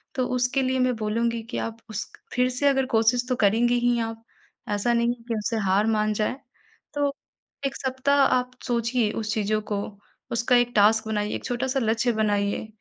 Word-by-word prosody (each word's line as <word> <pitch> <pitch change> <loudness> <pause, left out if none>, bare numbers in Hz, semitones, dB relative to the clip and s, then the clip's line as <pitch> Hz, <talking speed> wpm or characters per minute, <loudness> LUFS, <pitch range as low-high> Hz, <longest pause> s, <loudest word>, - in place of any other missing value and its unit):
तो 255 - +1
उसके 250 +2 +1
लिए 260 0 0
मैं 255 -1 +2
बोलूँगी 230 +2 -1
कि - - -3
आप 225 0 -4
उस 215 -2 -5 0.2
फिर 250 0 +2
से 255 +3 0
अगर 270 -1 +3
कोशिश 230 +2 +3
तो 255 - +2
करेंगी 230 +4 +3
ही 240 0 +2
आप 225 0 -4 0.5
ऐसा 205 +4 +1
नहीं 235 0 +2
है 235 -1 -16
कि 230 - -1
उससे 220 +2 -2
हार 195 +3 +3
मान 215 -1 +1
जाएँ। 215 +4 -1 0.6
तो 285 -1 0 0.5
एक 270 - -1
सप्ताह 265 +2 0
आप 250 -1 +1 0.2
सोचिए 235 -2 +1
उस 220 0 -2
चीज़ों 215 0 0
को 200 -1 0 0.5
उसका 235 +2 +2
एक 245 0 +3
टास्क 220 +1 +4
बनाइए 210 -1 -1
एक - - -6
छोटा-सा 260 +2 -1
लक्ष्य 230 +1 +1
बनाइए 205 -1 0
235 Hz, 185 wpm, -25 LUFS, 215-250 Hz, 0.6 s, टास्क